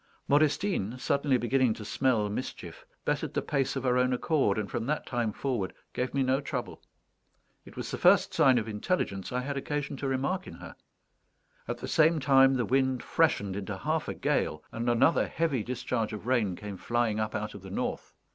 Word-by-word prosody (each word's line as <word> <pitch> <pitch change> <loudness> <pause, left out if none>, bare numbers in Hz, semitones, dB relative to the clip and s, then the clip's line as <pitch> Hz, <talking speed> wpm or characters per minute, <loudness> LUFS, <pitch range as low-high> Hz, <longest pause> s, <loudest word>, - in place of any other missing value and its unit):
Modestine, 145 - +1
suddenly 140 +1 +1
beginning 125 -1 +2
to 105 - -8
smell 115 -1 +1
mischief, 315 - -6 0.2
bettered - - -1
the - - +1
pace 140 -4 0
of 135 - -3
her 125 -1 +2
own 125 0 +2
accord, 125 -6 +1
and 105 -2 -2
from 120 -1 -3
that 150 +1 -1
time 120 -3 -1
forward 120 -5 -3 0.2
gave 125 +1 -2
me 140 -1 +1
no 130 +2 +1
trouble. - - -5 0.8
It - - -14
was - - -4
the - - -4
first - - +5
sign 130 -2 +5
of 115 -1 -1
intelligence 105 - -2
I 125 0 -1
had 140 +2 -3
occasion 145 0 -3
to 140 - -3
remark 140 +9 -1
in - - -9
her. - - -10 0.9
At - - -3
the - - -6
same 160 0 +4
time, 135 -1 +5
the 125 -2 0
wind 130 -1 +1
freshened 100 -12 +1
into 100 -1 -4
half - - -1
a - - -3
gale, 75 0 -1
and 115 +1 -2
another 120 +7 +3
heavy 160 -7 0
discharge 115 -2 -2
of 105 0 -7
rain 115 -7 +1
came 100 +1 -7
flying 120 -1 0
up 110 0 -2
out 105 +1 -3
of 100 - -10
the 95 - -10
north. 95 - -4
125 Hz, 195 wpm, -29 LUFS, 110-140 Hz, 0.9 s, first